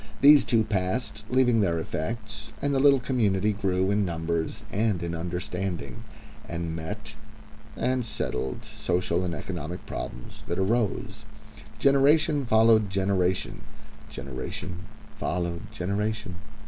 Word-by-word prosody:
These 145 +1 +8
two 115 -2 +3
passed, 105 +2 -2
leaving 125 -2 +4
their 85 -4 +2
effects, 110 +7 -4
and 140 0 0
the 135 - +2
little 140 0 +6
community 105 -5 +1
grew 95 -1 +1
in 105 0 +2
numbers 85 -2 -2
and 105 -4 +1
in 85 0 -3
understanding, 90 -3 -4 0.5
and 85 -1 -3
met 80 0 -6 0.6
and 130 -1 +1
settled 65 - -3
social 90 0 -1
and 85 -2 -2
economic 85 +2 -5
problems 60 - -7
that 85 - -2
arose. 105 +2 0 0.5
Generation 145 +1 +4
followed 110 -2 +5
generation. 95 -1 0 0.5
Generation 70 +7 -6 0.3
followed 85 +3 -3
generation. 105 0 -2
95 Hz, 115 wpm, -27 LUFS, 85-115 Hz, 0.6 s, These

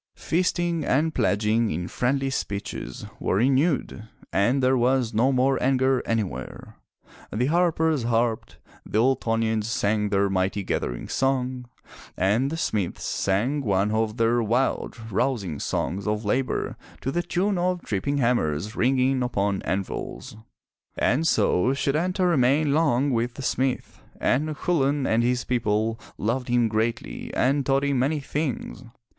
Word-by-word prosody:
Feasting 175 -1 0
and 155 +4 +1
pledging 110 0 +1
in 85 +3 -3
friendly 135 +4 0
speeches 100 -5 -4
were - - 0
renewed, 130 - +1 0.3
and 120 +8 +2
there 130 +1 +4
was 125 -1 +1
no 120 +5 +3
more 130 +1 +2
anger 130 0 +2
anywhere. 100 - -4 0.5
The 120 +4 0
harpers 160 -1 +2
harped, 115 -1 -1 0.3
the - - -3
Ultonians 115 -3 +1
sang 105 -2 0
their 100 0 +2
mighty 95 +1 0
gathering - - -3
song, 130 -2 -1 0.5
and 110 +9 +2
the 165 - -4
smiths 105 - -2
sang 115 +10 0
one 100 -3 +1
of 110 0 0
their 115 +1 +2
wild, 120 +5 0
rousing 100 - -1
songs 95 +3 -2
of 105 +1 -1
labor 130 +5 -1 0.2
to 135 - -2
the 175 - 0
tune 185 +2 0
of 180 0 0
tripping 110 +8 -1
hammers 105 - 0
ringing 130 +1 +2
upon 100 -5 0
anvils. 95 +2 -4 0.6
And 150 +8 +2
so 115 - +2
Setanta 175 +7 0
remained 145 -1 +3
long 145 -3 +2
with 120 0 -1
the 135 - -7
smith, 130 +1 -2 0.2
and 150 +4 0
Chulain 145 -5 +1
and 115 -1 +2
his 125 0 +1
people 115 -2 0 0.2
loved 125 +4 -1
him 120 -2 +2
greatly 120 - -2
and 140 +2 +2
taught 135 +1 +1
him 140 -2 +1
many 145 +4 +1
things. 140 -3 -4
125 Hz, 140 wpm, -25 LUFS, 110-140 Hz, 0.6 s, there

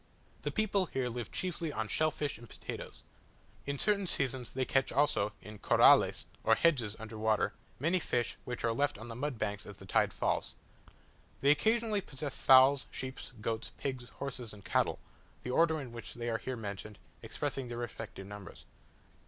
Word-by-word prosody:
The - - -1
people 205 -4 +1
here 130 -4 -1
live 120 -1 -5
chiefly 170 -3 -2
on 110 -4 -2
shell 155 +7 +2
fish 145 -5 -3
and 120 - -12
potatoes. - - -7 0.6
At 140 -1 -2
certain 200 -2 +2
seasons 130 -6 -1
they 130 0 -1
catch 135 0 +2
also, 120 -7 +2
in 105 -1 -9
"corrales," - - +6 0.2
or - - +5
hedges 125 -11 +2
under 110 0 -8
water, 110 -1 +2 0.2
many 170 +7 +2
fish 120 -7 -1
which 125 -1 -5
are 115 - +2
left 145 +4 +1
on 110 +3 -9
the 115 - -6
mud 135 0 -2
banks 105 -1 -3
as 105 -2 -9
the 95 - -12
tide 95 - +2
falls. - - -1 0.9
They 140 - +6
occasionally 220 +6 +2
possess 145 -4 -5
fowls, 130 +1 +6
sheep, 130 0 -5 0.2
goats, 110 +1 -2
pigs, 130 -3 -4
horses, 125 -5 -5
and 100 - -15
cattle; - - +2 0.5
the 125 - -3
order 160 +2 +4
in 130 -5 -7
which 115 0 -8
they 120 0 -2
are 115 - 0
here 130 +2 -4
mentioned, 105 -1 -6 0.2
expressing 135 -2 -3
their 120 0 -5
respective 115 -4 -6
numbers. 105 0 -10
125 Hz, 175 wpm, -33 LUFS, 110-145 Hz, 0.9 s, corrales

